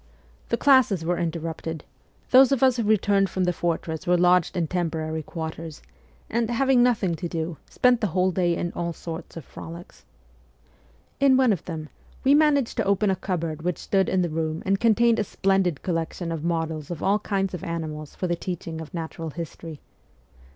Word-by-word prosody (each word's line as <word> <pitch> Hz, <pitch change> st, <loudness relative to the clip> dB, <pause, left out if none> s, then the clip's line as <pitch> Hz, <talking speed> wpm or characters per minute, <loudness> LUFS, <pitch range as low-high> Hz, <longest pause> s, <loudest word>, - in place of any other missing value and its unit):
The 235 Hz, -, +1 dB
classes 255 Hz, -, +4 dB
were 175 Hz, +1 st, 0 dB
interrupted; 165 Hz, -1 st, -4 dB, 0.5 s
those 260 Hz, 0 st, +7 dB
of 270 Hz, -2 st, +2 dB
us 260 Hz, -2 st, +4 dB
who 235 Hz, -, 0 dB
returned 205 Hz, -2 st, +2 dB
from 185 Hz, +2 st, -1 dB
the 180 Hz, 0 st, +1 dB
fortress 165 Hz, -1 st, -3 dB
were 180 Hz, 0 st, +4 dB
lodged 180 Hz, 0 st, +3 dB
in 170 Hz, -, +1 dB
temporary 160 Hz, -2 st, -2 dB
quarters, 160 Hz, 0 st, -6 dB, 0.5 s
and, 230 Hz, 0 st, -1 dB
having 260 Hz, +1 st, +3 dB
nothing 225 Hz, -8 st, +2 dB
to 175 Hz, +2 st, -4 dB
do, 165 Hz, -1 st, -4 dB
spent 250 Hz, -1 st, +3 dB
the 210 Hz, -, +2 dB
whole 185 Hz, +1 st, +1 dB
day 175 Hz, -2 st, +1 dB
in 175 Hz, -, -3 dB
all 170 Hz, -1 st, -3 dB
sorts 165 Hz, 0 st, -8 dB
of 160 Hz, -, -8 dB
frolics. 170 Hz, +2 st, -11 dB, 1.2 s
In 275 Hz, -2 st, +5 dB
one 255 Hz, -4 st, +4 dB
of 185 Hz, -, -5 dB
them 155 Hz, -3 st, -6 dB, 0.3 s
we 270 Hz, -, +5 dB
managed 290 Hz, -4 st, +3 dB
to -, -, +2 dB
open 200 Hz, +1 st, +2 dB
a -, -, +1 dB
cupboard 170 Hz, -4 st, -3 dB
which 180 Hz, +1 st, -1 dB
stood 195 Hz, -1 st, +1 dB
in 185 Hz, -1 st, +2 dB
the 175 Hz, -, -1 dB
room 160 Hz, 0 st, -2 dB
and 195 Hz, +1 st, +1 dB
contained 230 Hz, +1 st, +4 dB
a -, -, +2 dB
splendid 190 Hz, -5 st, 0 dB
collection 165 Hz, 0 st, -2 dB
of 160 Hz, -2 st, -4 dB
models 160 Hz, -3 st, -2 dB
of 175 Hz, -3 st, -5 dB
all 200 Hz, +2 st, +3 dB
kinds 195 Hz, -3 st, -1 dB
of 180 Hz, -, -5 dB
animals 155 Hz, -3 st, -5 dB
for -, -, -3 dB
the 175 Hz, -1 st, 0 dB
teaching 165 Hz, -2 st, -5 dB
of 160 Hz, -, -9 dB
natural 165 Hz, 0 st, -5 dB
history. 165 Hz, -1 st, -8 dB
175 Hz, 185 wpm, -25 LUFS, 165-205 Hz, 1.2 s, those